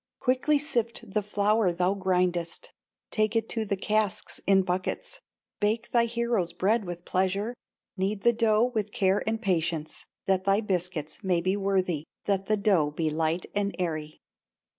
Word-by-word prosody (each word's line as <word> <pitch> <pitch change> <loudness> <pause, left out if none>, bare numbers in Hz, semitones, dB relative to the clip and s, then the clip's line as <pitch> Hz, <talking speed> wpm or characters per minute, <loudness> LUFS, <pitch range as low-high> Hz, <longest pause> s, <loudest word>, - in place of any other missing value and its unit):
Quickly 265 +3 +2
sift 235 -8 -2
the 210 - +2
flour 210 -1 +2
thou 180 +2 +1
grindest, 180 -3 0 0.4
Take 215 0 +1
it 225 0 +1
to 225 -2 0
the 200 -1 -1
casks 210 0 -1
in 195 -1 +5
buckets, 185 - -3 0.4
Bake 220 +3 0
thy 235 -1 +4
hero's 235 -7 -1
bread 205 +5 +1
with 175 -1 -7
pleasure, 195 +5 0 0.4
Knead 195 +2 -1
the 235 - +5
dough 225 +1 +3
with 215 -2 -1
care 195 0 +2
and 225 0 0
patience, 170 -6 -1 0.2
That 190 -1 +2
thy 195 +1 +4
biscuits 180 -5 -3
may 180 -3 +2
be 185 +3 0
worthy, 185 -6 0 0.2
That 195 -1 0
the 215 - +2
dough 195 -8 +3
be 155 +1 -1
light 160 +2 0
and 200 0 0
airy. 155 -4 -3
195 Hz, 160 wpm, -28 LUFS, 180-215 Hz, 0.4 s, in